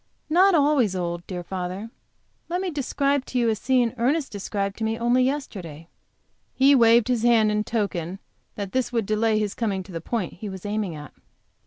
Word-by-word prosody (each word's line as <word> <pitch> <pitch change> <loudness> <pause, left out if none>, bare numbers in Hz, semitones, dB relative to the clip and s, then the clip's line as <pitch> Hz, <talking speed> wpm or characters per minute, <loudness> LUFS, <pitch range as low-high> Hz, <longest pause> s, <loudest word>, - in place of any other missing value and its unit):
"Not 370 +3 +5
always 280 - +3
old, 175 -1 -3
dear 180 -2 -5
father. 185 +4 -5 0.6
Let 355 +1 -1
me 375 -1 -2
describe 280 -1 0
to 255 - -4
you 235 -2 +3
a 220 - +1
scene 245 +1 +1
Ernest 275 +5 +1
described 200 0 -3
to - - -3
me 220 +1 0
only 240 +2 +2
yesterday." 185 - -4 0.7
He 275 +2 +5
waved 235 -3 +5
his 245 -3 +1
hand 225 -2 +4
in 210 0 0
token 195 -6 -2 0.4
that 200 -2 -5
this 260 -1 -1
would 230 -3 0
delay 215 +1 +1
his 210 -2 -1
coming 200 -5 -2
to 190 - -13
the 165 -2 -5
point 205 0 -3
he 205 +3 -7
was 190 0 -8
aiming 205 -5 -2
at. 150 -1 -10
220 Hz, 190 wpm, -24 LUFS, 190-255 Hz, 0.7 s, Not